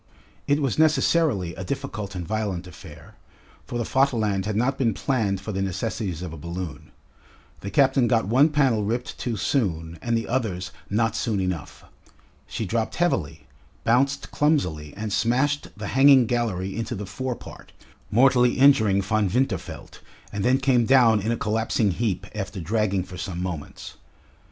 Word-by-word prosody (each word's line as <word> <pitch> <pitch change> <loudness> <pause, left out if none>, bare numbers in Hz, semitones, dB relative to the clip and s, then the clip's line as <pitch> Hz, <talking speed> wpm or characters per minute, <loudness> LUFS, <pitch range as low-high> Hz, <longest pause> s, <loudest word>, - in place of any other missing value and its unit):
It 145 +1 +2
was 135 +2 -1
necessarily 150 - +2
a 95 - -7
difficult 105 -4 -5
and 90 -2 -5
violent 105 -5 -2
affair, 90 - -13 0.5
for 120 - -4
the 120 - -1
Vaterland 110 -8 +1
had 110 - -2
not 125 +5 +1
been 115 -6 0
planned 110 -8 0
for 105 - -5
the 95 -1 -2
necessities 95 -2 -3
of 90 -3 -6
a - - -8
balloon. 85 0 -6 0.7
The 100 - -6
captain 135 +3 +3
got 115 -4 +2
one 135 +8 +4
panel 135 -8 +2
ripped 120 +4 -3
too 120 -3 -2
soon 85 - -1
and 120 -1 0
the 115 - -3
others 110 -8 -2 0.2
not 110 +1 +1
soon 110 -4 -1
enough. 90 -4 -4 0.6
She 110 - -4
dropped 110 +3 -2
heavily, 135 - -1 0.4
bounced 135 +4 +1
clumsily, 110 - 0
and 105 -1 -3
smashed 135 +7 +1
the 105 -1 -5
hanging 135 -1 +6
gallery 110 -6 -2
into 115 +1 -3
the 105 0 -5
fore 125 +6 -4
part, - - -13 0.4
mortally 125 +2 +4
injuring 110 -8 +5
Von 105 0 +1
Winterfeld, 125 +7 -3 0.3
and 100 -1 -2
then 130 +4 +4
came 130 -4 +2
down 120 -5 +5
in 110 +4 -1
a 115 - 0
collapsing 110 -1 0
heap 100 0 -2
after 100 -1 -5
dragging 100 +1 0
for 90 0 -10
some 90 -2 -4
moments. 90 -5 -6
110 Hz, 160 wpm, -24 LUFS, 95-130 Hz, 0.7 s, hanging